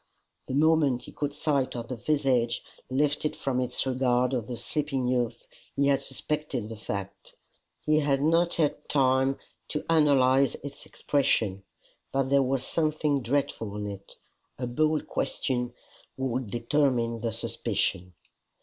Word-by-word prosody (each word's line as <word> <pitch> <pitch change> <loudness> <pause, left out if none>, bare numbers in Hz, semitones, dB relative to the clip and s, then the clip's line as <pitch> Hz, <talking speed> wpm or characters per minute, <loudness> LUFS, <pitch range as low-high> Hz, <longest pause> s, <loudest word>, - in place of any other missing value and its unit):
The 130 - -2
moment 150 -4 +3
he - - -10
caught 145 -1 -3
sight 140 -5 0
of 120 -1 -4
the 130 - -2
visage 125 -3 +1 0.3
lifted 145 +3 +1
from 130 -2 -1
its 125 - -2
regard 125 -1 +2
of 120 -4 -1
the 120 - -4
sleeping 140 -1 -1
youth, 125 -2 -1 0.3
he 140 - +2
had 140 - +3
suspected 135 -4 -3
the 115 - -6
fact. 100 -2 -6 0.5
He 155 0 +4
had 140 -2 +2
not 165 +2 +3
had 155 -3 0
time 135 -1 +3 0.3
to 150 - -3
analyze 140 -4 +4
its 140 -1 -8
expression, 110 -9 +1 0.5
but 135 -1 0
there 140 0 +5
was 130 0 0
something 155 -3 +1
dreadful 120 -5 -1
in 105 - -3
it. 100 -1 -8 0.4
A 125 - -3
bold 155 +5 +1
question 125 -2 -1 0.5
would 130 -3 -2
determine 120 -1 +1
the 115 -1 -1
suspicion. 90 -3 -2
130 Hz, 140 wpm, -28 LUFS, 120-145 Hz, 0.5 s, there